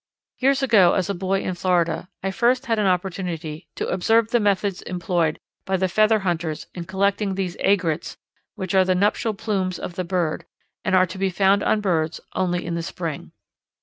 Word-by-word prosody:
Years 275 +1 +2
ago, 215 -9 +5
as 190 +1 0
a - - -1
boy 190 +1 -1
in 185 - -2
Florida, 175 -1 0
I 195 - 0
first 245 +6 +2
had 225 -2 0
an 205 - +2
opportunity 180 -3 -2
to - - -2
observe 225 +4 +2
the 240 - +4
methods 200 -2 0
employed 175 -3 -1 0.3
by 190 0 0
the 190 0 +1
feather 215 +4 +3
hunters 170 -4 -2
in 175 -2 -6
collecting 195 +1 0
these 185 -2 -2
aigrettes 175 -5 0 0.4
which 190 -4 -4
are 190 -1 +5
the 185 0 +1
nuptial 210 +3 +1
plumes 190 -3 -2
of 180 - -6
the 185 - -3
bird 170 -3 -1 0.4
and 190 - +2
are 185 0 +5
to 185 +1 -9
be 195 0 +1
found 195 +2 +3
on 215 - +1
birds 165 -5 0
only 175 -1 -1
in 170 - -3
the 170 - -2
spring. 165 -2 -5
185 Hz, 190 wpm, -23 LUFS, 175-200 Hz, 0.4 s, ago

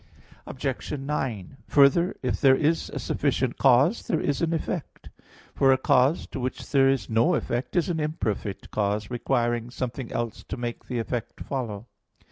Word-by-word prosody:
Obj. 135 +1 -4
9: 135 -5 -3
Further, 150 +6 +4
if 125 - -1
there 135 -2 +6
is 155 +4 +1
a - - -6
sufficient - - -1
cause, 135 - +4
there 160 - +1
is 145 -3 -1
an 170 -1 +1
effect; 165 0 -4 0.4
for 135 -1 +4
a 130 - +5
cause 135 +2 +3
to - - -5
which 130 0 -4
there 135 -2 +5
is 135 -1 0
no 115 +1 +3
effect 120 +2 -3
is 175 - +2
an 170 -3 -1
imperfect 110 -10 -3
cause, 105 +1 -1
requiring 120 -1 0
something 125 0 -5
else 120 -1 -3
to - - -5
make 120 -1 -5
the 125 - -3
effect 115 +1 -4
follow. 115 -6 -4
130 Hz, 165 wpm, -26 LUFS, 120-145 Hz, 0.4 s, there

